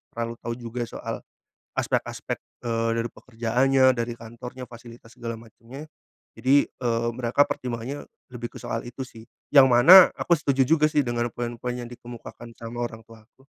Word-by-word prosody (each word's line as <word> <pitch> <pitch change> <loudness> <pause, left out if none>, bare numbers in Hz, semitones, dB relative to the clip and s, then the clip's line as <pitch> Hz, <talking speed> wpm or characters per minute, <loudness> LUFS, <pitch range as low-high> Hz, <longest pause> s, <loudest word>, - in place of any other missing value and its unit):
terlalu 115 0 -3
tahu 115 - -2
juga 120 0 -4
soal - - -5 0.6
aspek-aspek, - - -2 0.2
eee, 115 -1 0
dari 115 0 -2
pekerjaannya, 130 +3 +1
dari 120 0 -2
kantornya, 120 +2 -9
fasilitas 115 -1 -13
segala 115 -1 -5
macemnya. 120 +6 -12 0.5
Jadi, 140 +2 +4
eee, 115 -1 -1
mereka 125 +3 +2
pertimbangannya 125 +3 -4 0.3
lebih 120 -1 -5
ke - - -6
soal 115 - -3
itu 125 +2 -8
sih. 115 -2 -13 0.3
Yang 140 -2 +9
mana 155 +10 +9
aku 175 - +2
setuju 135 -2 +2
juga 155 0 +4
sih 150 - +2
dengan 120 0 -1
poin-poin 120 +1 -4
yang 120 -1 -7
dikemukakan 120 -1 -10
sama 115 +1 -6
orang 115 -1 -6
tuaku. 115 +4 -19
120 Hz, 155 wpm, -25 LUFS, 115-130 Hz, 0.6 s, Yang